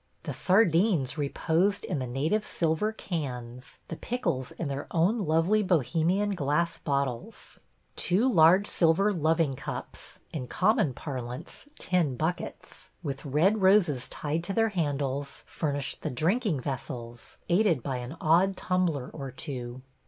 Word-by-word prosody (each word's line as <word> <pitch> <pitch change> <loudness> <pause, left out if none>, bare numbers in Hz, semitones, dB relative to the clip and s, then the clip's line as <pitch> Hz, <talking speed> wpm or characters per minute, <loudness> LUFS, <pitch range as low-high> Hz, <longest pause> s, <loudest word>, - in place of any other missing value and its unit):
The - - -4
sardines 180 - +3
reposed 165 +6 0
in 165 -7 -2
the 130 - -3
native 155 - 0
silver 165 +3 0
cans, 125 - -6
the - - -5
pickles 145 - -2
in 165 - -5
their 140 0 -4
own 180 +8 +2
lovely 170 +4 +2
Bohemian 180 - +1
glass 165 +1 0
bottles; 140 - -3 0.4
two 200 +8 +2
large 185 -2 +6
silver 190 +3 +3
loving 160 -4 +1
cups - - -7
(in 130 -5 -4
common 185 - +2
parlance, 125 - -6
tin 175 -8 0
buckets), 160 +6 -4
with 140 -3 -4
red 170 +10 +2
roses 185 -9 +4
tied 155 +3 -3
to 195 - -3
their 225 +2 +2
handles, 145 -6 -2
furnished 145 -3 -3
the - - -2
drinking 170 - 0
vessels, 120 -3 -6
aided 175 - +2
by 135 -2 -2
an 125 +6 -7
odd 180 +4 +3
tumbler 170 -8 0
or 135 -3 -6
two. 130 -2 -5
160 Hz, 135 wpm, -28 LUFS, 135-190 Hz, 0.4 s, large